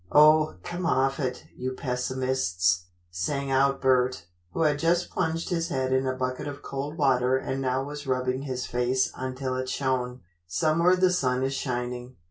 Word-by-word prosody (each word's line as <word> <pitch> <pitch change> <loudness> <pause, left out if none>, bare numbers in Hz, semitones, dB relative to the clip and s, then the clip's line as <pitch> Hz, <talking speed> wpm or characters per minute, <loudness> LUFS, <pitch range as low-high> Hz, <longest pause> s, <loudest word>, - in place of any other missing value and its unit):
"Oh, 155 -3 +6
come 175 0 -3
off, 135 -1 +2 0.3
you 130 +1 -3
pessimists," 125 -10 0 0.3
sang 135 +11 -2
out 135 +1 +3
Bert, 130 -6 +2 0.3
who 165 - -3
had 150 -2 +2
just 170 +2 +1
plunged 165 -2 -1
his 170 -2 0
head 130 -5 -1
in 130 0 +2
a 130 - 0
bucket 130 +2 -3
of 145 0 -7
cold 140 +3 -4
water 130 -3 +3
and 130 0 -3
now 130 0 0
was 145 0 -7
rubbing 130 0 0
his 130 -3 -3
face 125 +1 +1
until 130 0 -3
it 130 0 -3
shone, 130 -2 -1 0.3
"somewhere 165 - +3
the 185 0 +3
sun 130 -6 +1
is 135 +1 0
shining." 125 -1 -3
130 Hz, 165 wpm, -27 LUFS, 125-145 Hz, 0.3 s, Oh